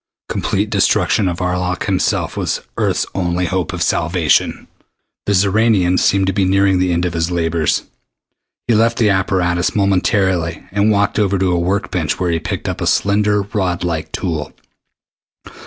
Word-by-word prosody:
Complete - - -1
destruction 105 - +2
of 90 -1 -2
Arlok 90 0 -1
himself 95 -2 -1
was - - -2
Earth's - - 0
only 90 -1 -1
hope 90 -1 -2
of 85 0 -2
salvation. 85 -2 +1 0.6
The 100 - +2
Xoranian 95 -2 +2
seemed 95 0 +2
to 95 - 0
be 100 - +1
nearing 95 0 +2
the 90 -1 +1
end 85 +1 0
of 90 - -2
his 80 +1 -1
labors. 80 -3 0 0.8
He 120 - +3
left 115 +2 +2
the 110 -3 +3
apparatus 95 -2 0
momentarily 95 -4 +1
and 100 +2 +2
walked 100 0 +1
over 100 -2 +1
to 95 -1 +1
a 90 - +1
work 100 +4 -1
bench 80 -5 -1
where 90 -1 0
he 85 - 0
picked - - -5
up - - -4
a - - -1
slender 105 0 +2
rod 95 -4 -2
like 85 -3 -3
tool. 80 -4 -3
90 Hz, 165 wpm, -17 LUFS, 85-100 Hz, 0.8 s, He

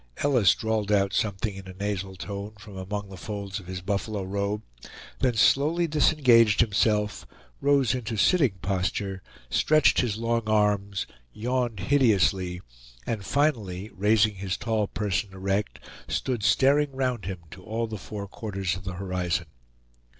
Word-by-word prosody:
Ellis 120 - +4
drawled 110 -2 -1
out 100 -1 +2
something 105 0 -1
in 95 -1 -9
a 95 - -9
nasal 100 -1 -3
tone 100 +2 -6
from 105 -1 -12
among 100 +2 -5
the 95 - -9
folds 100 0 -5
of 90 - -13
his 95 0 -5
buffalo 100 +1 -2
robe; 100 +2 -2 0.6
then 125 -3 +1
slowly 150 +10 +3
disengaged 130 -9 +4
himself, 105 -1 +1 0.3
rose 140 -4 +3
into 115 -3 -3
sitting 140 - +4
posture, 95 0 -1 0.3
stretched 155 - +4
his 115 -5 -1
long 115 +1 0
arms, 105 -2 +1 0.3
yawned 120 -2 -1
hideously, 100 -9 +2 0.4
and 110 -4 -3
finally, 110 -9 0
raising 105 +2 +3
his 95 -1 -3
tall 110 -3 0
person 100 -1 -2
erect, 95 +2 -2 0.3
stood 125 -4 -1
staring 140 +9 +3
round 125 -7 -1
him 95 -1 -4
to 95 - -11
all 115 +3 -2
the 110 -2 -6
four 100 +1 -6
quarters 95 -4 -3
of 95 - -8
the 95 - -4
horizon. 90 -2 -2
105 Hz, 145 wpm, -26 LUFS, 95-115 Hz, 0.6 s, Ellis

